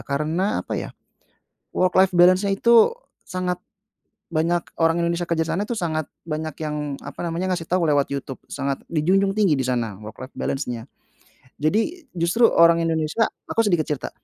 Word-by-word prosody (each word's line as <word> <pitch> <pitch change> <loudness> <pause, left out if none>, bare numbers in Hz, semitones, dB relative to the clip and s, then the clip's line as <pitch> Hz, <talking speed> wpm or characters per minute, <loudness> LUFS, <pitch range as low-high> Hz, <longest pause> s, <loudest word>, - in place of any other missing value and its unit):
karena 155 - -1
apa - - -3
ya, - - -5 0.9
worklife 185 +1 +3
balance-nya 185 +3 +5
itu 235 - +5 0.3
sangat 180 -1 -2 0.7
banyak, 170 +1 +1 0.2
orang 165 +1 +2
Indonesia 170 +1 0
kerja 165 -1 +1
sana, 195 +5 0
itu 235 - -5
sangat 160 -6 -1 0.2
banyak 155 +1 -3
yang 150 -2 -3
apa - - -9
namanya, 170 +3 -2
ngasih 165 - -5
tahu 175 -2 +1
lewat 145 -2 +2
YouTube, 135 -1 -4
sangat 140 -1 -3
dijunjung 190 +5 +2
tinggi 195 -8 +3
di 130 - 0
sana 120 -5 -1
worklife 110 +5 -10
balance-nya. 125 -4 -3 0.8
Jadi, 225 - 0
justru 175 +8 +3
orang 170 -3 +5
Indonesia 165 +6 +1 0.2
aku - - -3
sedikit 175 -5 +2
cerita. 145 -3 -3
165 Hz, 150 wpm, -23 LUFS, 150-185 Hz, 0.9 s, balance-nya